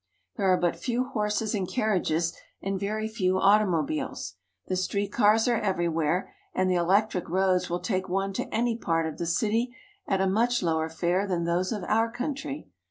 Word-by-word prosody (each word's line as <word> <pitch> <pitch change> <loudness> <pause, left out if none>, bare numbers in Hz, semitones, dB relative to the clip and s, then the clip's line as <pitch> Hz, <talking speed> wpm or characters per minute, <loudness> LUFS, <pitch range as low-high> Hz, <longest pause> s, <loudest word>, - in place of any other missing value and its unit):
There 200 -3 0
are 185 - +4
but 175 -1 0
few 245 0 -1
horses 215 -4 -1
and 195 -4 -1
carriages 175 -7 +1 0.3
and 195 0 -2
very 215 +2 -2
few 185 -4 0
automobiles. 175 - +1 0.3
The 185 - -2
street 200 +2 -1
cars 220 0 +4
are 240 -2 +2
everywhere, 175 - 0 0.2
and 185 - +2
the 185 - +2
electric 180 +2 +2
roads 185 0 +2
will 175 +1 -2
take 190 -4 -1
one 195 +1 -1
to - - -4
any 230 +1 +1
part 165 -7 0
of 160 - -5
the 170 - -2
city 225 +7 0 0.3
at 195 - +1
a 190 - +2
much 230 +4 +2
lower 160 -1 +1
fare 175 +4 0
than 175 -3 0
those 175 +2 0
of 210 -4 -3
our 225 +1 +2
country. 245 - -4
190 Hz, 180 wpm, -27 LUFS, 175-215 Hz, 0.3 s, are